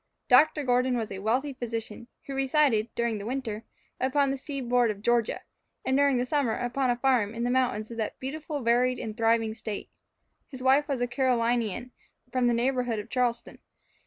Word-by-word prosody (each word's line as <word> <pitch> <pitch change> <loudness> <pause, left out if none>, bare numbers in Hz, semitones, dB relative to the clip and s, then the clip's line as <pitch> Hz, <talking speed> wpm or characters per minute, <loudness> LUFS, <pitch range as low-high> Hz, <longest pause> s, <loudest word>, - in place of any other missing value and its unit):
Dr. 300 +4 +5
Gordon 250 0 +2
was 225 -2 -3
a 195 - -5
wealthy 255 +8 0
physician, 230 -2 -5 0.2
who 275 - -6
resided, 270 -4 +2
during 235 -2 -1
the 200 - -7
winter, 235 -4 -4 0.3
upon 270 +1 +2
the - - -1
seaboard 250 -4 0
of 205 -1 -5
Georgia, 240 -1 +1 0.4
and 265 - +1
during 280 -1 +4
the 245 - 0
summer 270 -4 +1
upon 250 +2 -1
a 245 - +3
farm 240 -4 +1
in 235 - -3
the 245 - +1
mountains 245 -4 0
of 230 - -7
that 220 -2 -3
beautifully 290 +1 -5
varied 245 +2 +3
and 215 -1 -5
thriving 225 -1 +2
State. 220 -2 -6 0.6
His 260 -3 -9
wife 275 +3 +4
was 275 -4 -2
a 245 - +1
Carolinian, 240 -2 0 0.4
from 255 -1 +2
the 240 - +3
neighbourhood 245 -1 0
of 210 +2 -7
Charleston. 245 -2 -1
245 Hz, 185 wpm, -27 LUFS, 230-265 Hz, 0.6 s, Dr